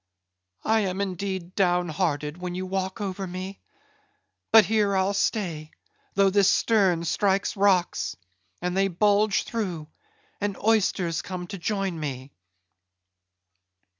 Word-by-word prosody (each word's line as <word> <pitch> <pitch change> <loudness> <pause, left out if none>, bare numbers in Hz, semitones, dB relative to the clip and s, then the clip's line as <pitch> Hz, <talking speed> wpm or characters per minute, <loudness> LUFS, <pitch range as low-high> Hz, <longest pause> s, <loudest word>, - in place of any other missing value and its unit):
I 220 0 +3
am 190 -2 -1
indeed 190 -2 -3
down 180 -2 +2
hearted 150 -3 -1
when 180 -1 -4
you 185 +1 -3
walk 190 0 -3
over 195 -1 -3
me. 185 +2 -6 0.9
But 220 -2 +8
here 210 -1 +2
I'll 190 +1 +1
stay, 175 -7 -1 0.5
though 195 0 +4
this 200 0 +4
stern 195 -8 +3
strikes 200 +2 +1
rocks; 195 -3 +2 0.5
and 180 0 -1
they 195 0 +3
bulge 205 +3 +2
through; 180 -9 -4 0.5
and 205 -1 -2
oysters 190 -6 +1
come 180 -1 -6
to 195 +2 -7
join 195 -1 -2
me." 135 -2 -5
190 Hz, 125 wpm, -26 LUFS, 175-200 Hz, 0.9 s, But